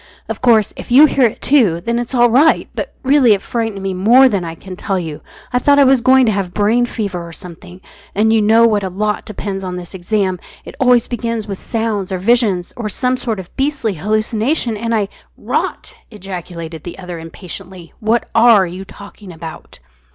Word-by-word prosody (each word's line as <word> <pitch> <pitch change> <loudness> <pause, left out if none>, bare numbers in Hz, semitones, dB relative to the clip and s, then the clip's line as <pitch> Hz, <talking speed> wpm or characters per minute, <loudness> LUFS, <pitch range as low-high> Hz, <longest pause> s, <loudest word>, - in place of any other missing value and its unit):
Of - - -5
course, 225 -4 +3
if - - -10
you 270 +5 +8
hear 270 -3 +3
it 220 - -9
too, 225 - +3
then 235 +5 -1
it's 240 +2 -4
all 240 -1 +4
right; 295 +7 +4
but - - -4
really 265 -4 +5
it 195 - -1
frightened 225 -4 -3
me 195 -1 -2
more 235 +9 +5
than 200 -7 -1
I 165 -1 -6
can 185 +2 -10
tell 195 +1 -2
you. 160 -4 -5 0.3
I 250 - +3
thought 285 +2 +3
I 285 - +7
was 265 -2 +4
going 260 +1 +5
to 220 - +2
have 195 -3 -3
brain 225 +4 +2
fever, 200 -7 -4
or - - -10
something, 180 +1 -12 0.3
and 220 +2 +3
you 225 - +3
know 225 +2 +5
what 215 -3 +2
a 190 - -3
lot 210 +3 -2
depends 195 -2 -5
on 180 -1 -4
this 180 0 -8
exam. 190 0 -1 0.3
It - - -9
always 250 -2 +3
begins 230 -2 -3
with 195 -2 -5
sounds, 220 -4 -3
or 190 - -1
visions, 200 -3 +1
or 225 -3 -4
some 250 +5 0
sort 235 -5 -3
of 185 - -11
beastly 270 -6 -1
hallucination, 215 - 0
and 230 +2 -2
I 205 -2 0 0.2
" - - -40 0.2
"Rot!" - - -2 0.2
ejaculated 175 -6 -8
the 175 - -8
other 180 -3 -7
impatiently. 175 +1 -10
"What 225 +2 0
are 225 -4 +6
you 180 +2 -7
talking 200 0 -13
about?" 160 -1 -10
210 Hz, 205 wpm, -16 LUFS, 185-235 Hz, 0.3 s, you